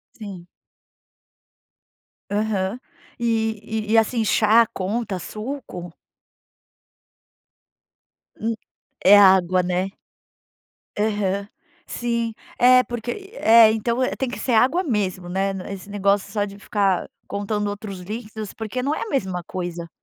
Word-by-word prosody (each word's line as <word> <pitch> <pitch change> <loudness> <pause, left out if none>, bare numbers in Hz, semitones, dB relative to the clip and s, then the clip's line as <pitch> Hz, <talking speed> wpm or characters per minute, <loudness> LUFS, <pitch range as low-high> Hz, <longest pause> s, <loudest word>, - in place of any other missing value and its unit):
Sim. 195 -5 -9 1.8
Aham. 205 +1 -1 0.4
E 225 -2 0 0.3
e - - -1
e, 225 - +6
assim, 225 0 +2
chá 220 +2 +5
conta, 205 -1 -3
suco? 215 - -7 2.5
Hum, 225 +1 0 0.5
é 200 +2 +9
água, 185 -2 +5
né? 180 +2 -1 1.1
Aham. 205 -2 0 0.4
Sim, 235 -1 -2 0.3
é 255 +1 +7
porque 240 0 -5
e 405 +4 -10
é. 225 - +7
Então, 235 +3 -1
eh, - - 0
tem 265 - -2
que - - -6
ser 255 - -1
água 265 +11 +4
mesmo, 190 - -1
né. 195 +2 0
N 190 0 -7
esse 195 +1 -9
negócio 200 -1 +1
só 205 -2 0
de 200 0 -9
ficar 200 -3 0 0.2
contando 205 +1 -2
outros 205 -2 -6
líquidos, 215 +1 -6
porque 225 +3 -4
não 285 +4 0
é - - -4
a - - -4
mesma 190 - -1
coisa. 175 -1 -5
210 Hz, 125 wpm, -23 LUFS, 190-230 Hz, 2.5 s, é